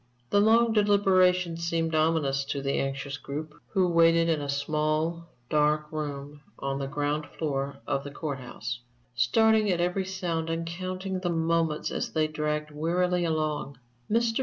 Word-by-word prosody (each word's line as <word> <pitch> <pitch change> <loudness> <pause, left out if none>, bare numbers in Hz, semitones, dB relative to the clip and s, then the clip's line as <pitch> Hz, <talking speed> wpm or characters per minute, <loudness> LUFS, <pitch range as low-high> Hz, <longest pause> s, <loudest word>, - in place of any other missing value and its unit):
The 205 - +5
long 225 +2 +4
deliberation 185 -4 +3
seemed 165 -1 -1
ominous 155 -3 +2
to 140 0 -3
the 140 0 0
anxious 135 0 -3
group 150 +2 -6
who 185 -2 +2
waited 165 -1 +4
in 160 -3 +1
a 140 - -4
small, 155 +3 -1 0.2
dark 150 +1 +1
room 145 -1 -5 0.2
on 135 0 -3
the 135 - -3
ground 145 +1 -1
floor 140 -3 -2
of 135 - -1
the 145 - -6
court 145 -1 -4
house, 120 -1 -6 0.3
starting 215 - +3
at 175 - 0
every 180 +2 0
sound 175 -4 -2
and 165 0 -2
counting 185 +2 -4
the 180 -1 -2
moments 165 -2 0
as - - -2
they 155 -1 +2
dragged 150 0 -2
wearily 175 +3 0
along. 155 -4 -1 0.3
Mr. 230 +1 +2
160 Hz, 160 wpm, -28 LUFS, 145-180 Hz, 0.3 s, The